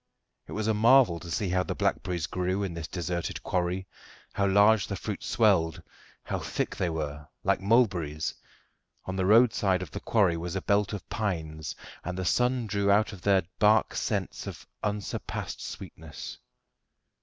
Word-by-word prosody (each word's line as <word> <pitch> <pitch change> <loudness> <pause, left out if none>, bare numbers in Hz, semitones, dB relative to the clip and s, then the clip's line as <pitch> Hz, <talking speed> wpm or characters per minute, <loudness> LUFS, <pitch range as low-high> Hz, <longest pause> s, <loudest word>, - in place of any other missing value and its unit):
It - - -8
was 110 0 -2
a 110 - +2
marvel 115 -4 +5
to 85 - -9
see 85 +4 -1
how 90 +1 +2
the - - -3
blackberries 90 -4 -1
grew 90 +2 -1
in 95 -3 -3
this 85 -1 -5
deserted 85 -1 -3
quarry; 90 +1 -1 0.5
how 100 - +1
large 100 +1 +5
the 100 - -3
fruit 100 +2 -5
swelled, 95 -8 +2 0.4
how - - -3
thick - - -3
they 90 - 0
were 75 -2 -4 0.2
like - - +2
mulberries. 95 -9 +2 0.7
On 95 - -4
the 95 -1 0
road 115 +3 +6
side 95 -2 +1
of 85 - -10
the - - -5
quarry 95 -7 +2
was 85 +2 -4
a 95 - -1
belt 100 0 +2
of 100 -5 -6
pines, 80 -7 -3 0.3
and 90 +2 -4
the 95 - -2
sun 125 +5 +2
drew 100 -1 0
out 105 +2 +3
of 95 - -10
their 95 -1 +3 0.2
bark 110 0 +4
scents - - -2
of - - -8 0.2
unsurpassed 105 -1 -4
sweetness. 80 -3 -8
95 Hz, 170 wpm, -28 LUFS, 85-105 Hz, 0.7 s, road